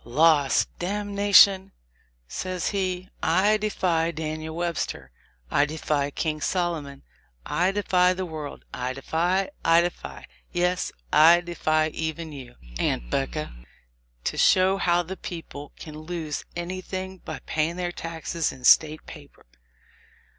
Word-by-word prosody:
"Loss! 145 +2 +4
damnation 200 0 +4 0.3
!" - - -35 0.2
says 185 - -3
he. 185 -2 -2
"I 190 +6 +3
defy 180 -6 0
Daniel 155 0 -5
Webster, 170 - -3 0.4
I 145 - +4
defy 150 -2 -1
King 155 +1 -3
Solomon, 160 -7 -2 0.4
I 175 +5 +1
defy 185 -3 +3
the 185 0 -4
world 155 -4 -7
— - - -35
I 125 +1 -3
defy 175 +8 0
— - - -35
I 165 +1 +5
defy 175 0 -5
— - - -38
yes, 180 +1 0 0.2
I 170 +3 +7
defy 155 -2 0
even 160 +1 -4
you, 130 -4 -10 0.2
Aunt - - -1
'Becca, - - -2 0.7
to - - -2
show 190 +1 +4
how 175 -2 +2
the 190 +3 -7
people 145 -4 -8
can 155 -1 -9
lose 155 -2 -5
anything 185 +2 -5
by - - -7
pay 155 0 0
ing 170 - -7
their 175 -1 -2
taxes 165 -1 -3
in 130 - -13
State 155 +3 +5
paper." 145 -2 -13
170 Hz, 140 wpm, -25 LUFS, 155-185 Hz, 0.7 s, I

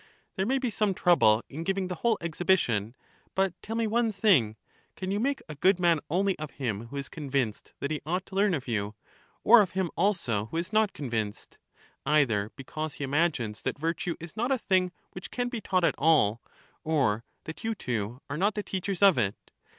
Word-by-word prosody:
There 190 +1 -1
may 265 +2 +2
be 255 -3 -1
some 210 -3 +1
trouble 115 -13 +4
in 155 +4 -6
giving 195 +1 -1
the 180 - -3
whole 235 -2 +3
ex 170 -2 -5
hibition; 120 - +2 0.4
but 190 -2 +2
tell 225 - -5
me 230 0 +1
one 225 +1 +1
thing, 185 - +3 0.2
— - - -37
can 185 0 -3
you 200 - 0
make 275 +4 -1
a 150 - -6
good 185 +6 +3
man 170 -3 +4
only 190 +4 +1
of 155 -1 -5
him 115 -5 -3
who 140 - -7
is 140 -1 -4
convinced 135 -8 -3
that 140 - -3
he 155 - -2
ought 180 +5 -2
to 190 - -11
learn 200 -2 +3
of 135 -4 -6
you, 105 -2 -2 0.5
or 235 0 +8
of 195 - -1
him 190 -2 -1
also 140 - 0
who 165 - -5
is 170 +5 -3
not 215 -2 +3
convinced? 115 -7 -4 0.4
either 125 -9 +2
because 155 +2 -5
he - - -5
imagines 135 -7 0
that - - -2
virtue 165 +3 -2
is 165 -1 -9
not 240 +4 -1
a 265 - +3
thing 185 -5 +1 0.2
which 185 - -8
can 245 0 -2
be 240 -3 -4
taught 185 -3 +1
at 160 -5 +4
all, 135 -8 +4 0.4
or 130 -9 +1 0.2
that 160 - -8
you 225 0 -1
two 120 - -3
are 145 - -4
not 200 +5 +1
the 210 - -2
teachers 195 0 -2
of 190 -10 +7
it. 100 -3 -2
165 Hz, 210 wpm, -28 LUFS, 130-195 Hz, 0.5 s, or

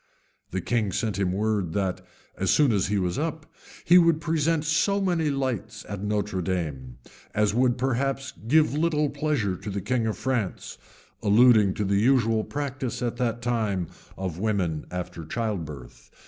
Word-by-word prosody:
The 95 - -3
king 110 0 0
sent 100 0 -2
him 95 -2 +1
word, 100 -3 -1
that, 95 -1 -1 0.3
as - - -1
soon 145 -4 +4
as 100 -4 +1
he 105 +1 0
was 90 +1 -1
up, 160 0 -3 0.4
he 180 +1 +7
would 165 -2 +4
present 160 -1 0
so 200 +5 +2
many 175 -5 +1
lights 130 - -3
at 100 -2 -5
Notre 105 -2 -1
dame, 75 -9 -3 0.4
as 105 -1 +2
would 125 +1 +2
perhaps 135 +1 -1
give 155 +3 +4
little 150 -1 +1
pleasure 140 -10 0
to 100 - -7
the 100 0 -2
king 115 +4 0
of 110 - -2
France; 120 -6 -3 0.4
alluding 110 -2 +5
to 105 - -1
the 100 +1 +2
usual 115 -2 +3
practice 135 -3 -4
at 120 0 -2
that 120 -1 -1
time 110 -7 -1 0.3
of 90 -3 -4
women 95 -7 -1
after 90 -2 -5
childbirth. 80 - -5
110 Hz, 160 wpm, -26 LUFS, 95-135 Hz, 0.4 s, he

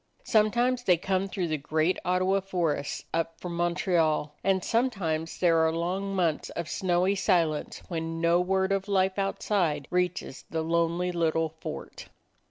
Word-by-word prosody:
Sometimes 240 +3 +2
they 180 -4 +5
come 190 +2 -1
through 185 -2 -2
the 155 -1 -1
great 155 +5 0
Ottawa 185 +2 +2
forests 170 -7 -2
up 165 0 -2
from 175 -1 -5
Montreal, 170 -3 +1
and 190 -1 +2
sometimes 190 -10 -1
there 165 -2 +3
are 160 0 +3
long 185 +4 -2
months 170 -5 0
of 170 -1 -5
snowy 185 +2 +1
silence 170 -6 0
when 165 -1 -3
no 170 +1 +3
word 190 +1 +1
of 195 0 0
life 190 -1 +1
outside 180 -7 0
reaches 180 -6 -1
the 160 -1 -2
lonely 170 +2 +1
little 165 -2 +1
fort. 160 +1 -8
175 Hz, 150 wpm, -28 LUFS, 165-190 Hz, -, they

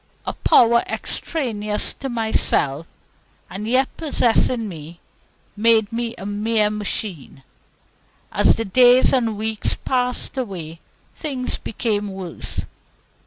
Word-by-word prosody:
A - - -3
power 235 0 +4
extraneous 215 -9 -2
to 270 - -6
myself, 195 - 0 0.6
and 210 +3 -5
yet 255 +3 +3
possessing 245 -6 +1
me, 165 -2 -9 0.6
made 220 0 +3
me 235 0 -2
a 195 - -8
mere 210 +1 +1
machine. 200 - -4 0.9
As - - +4
the 225 - -3
days 250 +6 +5
and 230 -5 +1
weeks 220 0 0
passed 250 +1 -2
away 170 -9 -6 0.3
things 265 -5 -3
became 210 -2 -2
worse. 190 -3 -5
220 Hz, 110 wpm, -21 LUFS, 200-245 Hz, 0.9 s, days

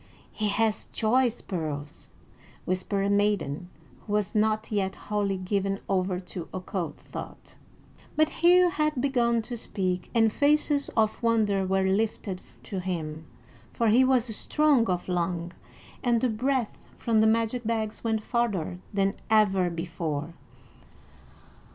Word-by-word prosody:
"He 215 - -2
hath 215 +1 0
choice 240 +1 +2
pearls," 150 -5 -5 0.6
whispered 185 +2 -1
a 200 - +1
maiden 200 -6 0 0.4
who 205 - -3
was 210 -1 0
not 215 +1 +1
yet 195 -2 0
wholly 205 -2 -1
given 195 +1 -1
over 185 -1 0
to 180 -2 -8
occult 185 -1 -4
thought. - - -9 0.6
But 310 0 +4
Hugh 355 +1 +6
had 305 -5 0
begun 240 -4 +2
to 240 - -6
speak, 185 -5 -2
and 225 -2 +4
faces 290 0 +2
of 220 -1 +2
wonder 215 -5 +2
were 190 0 +2
lifted 195 -1 -1 0.2
to 195 - -4
him, 160 -4 -4 0.5
for 230 -2 +2
he 240 +5 +6
was 250 -4 +2
strong 295 -4 +3
of 180 -1 -1
lung, 175 -1 -1 0.5
and 240 -2 +2
the 255 - +1
breath 250 +1 -1 0.2
from 225 -2 +2
the 220 - +5
magic 230 +2 +1
bags 220 -1 -2
went 220 -2 0
farther 205 -8 -1
than 195 -1 +1 0.2
ever 195 -4 +4
before. 165 -2 -4
210 Hz, 135 wpm, -27 LUFS, 185-230 Hz, 0.6 s, Hugh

